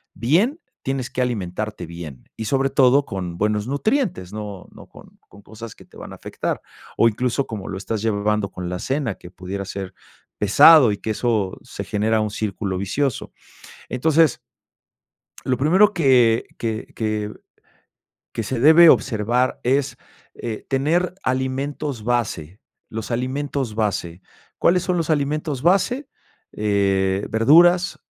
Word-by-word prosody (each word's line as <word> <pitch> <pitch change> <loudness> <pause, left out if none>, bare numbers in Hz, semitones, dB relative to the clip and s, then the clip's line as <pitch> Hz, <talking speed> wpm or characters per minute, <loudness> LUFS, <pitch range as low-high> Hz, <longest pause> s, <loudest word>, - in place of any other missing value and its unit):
bien, 190 - +1 0.2
tienes 135 -2 -3
que 130 - -2
alimentarte 105 -4 -3
bien 80 -6 -9
y, 110 - -5
sobre 135 +2 +1
todo, 135 +2 +4
con 90 -7 -5
buenos 105 +2 0
nutrientes, 140 - -1
no 105 -3 -7
no - - -14
con - - -17
con 100 - -17
cosas 110 +1 -10
que - - -17
te - - -18
van - - -9
a - - -9
afectar, - - -4 0.4
o 115 - +5
incluso 125 +4 0
como 105 -4 -6
lo 95 - -4
estás 105 +2 -4
llevando 105 -1 0
con 90 -1 -6
la 90 0 -4
cena, 135 -2 -2
que 90 - -13
pudiera 95 +2 -6
ser 95 -1 -6 0.5
pesado 135 +5 +7
y 100 - -3
que 110 - -4
eso 110 -4 -1
se - - -7
genera 110 +2 0
un 105 -1 -2
círculo 100 -2 -3
vicioso. 125 +6 -2 0.6
Entonces 155 +2 +2 1.1
lo 125 - 0
primero 190 +9 +4
que 125 - +3
que 110 0 -3
que 110 -2 -2 1.0
que 115 - -3
se 120 +3 -3
debe 160 +5 +8
observar 120 -1 +2
es, 135 +2 +1 0.4
eh, 115 -2 -6
tener 160 +7 0
alimentos 130 -1 -2
base, 105 -7 -2 0.3
los 110 +1 -6
alimentos 130 0 -2
base, 95 -5 -2 0.4
¿cuáles 180 +1 +3
son 180 - 0
los 165 -2 -1
alimentos 150 -2 -1
base?, 200 - +2 0.5
eh, 100 -2 0
verduras, 175 +10 +4
115 Hz, 145 wpm, -21 LUFS, 105-140 Hz, 1.1 s, debe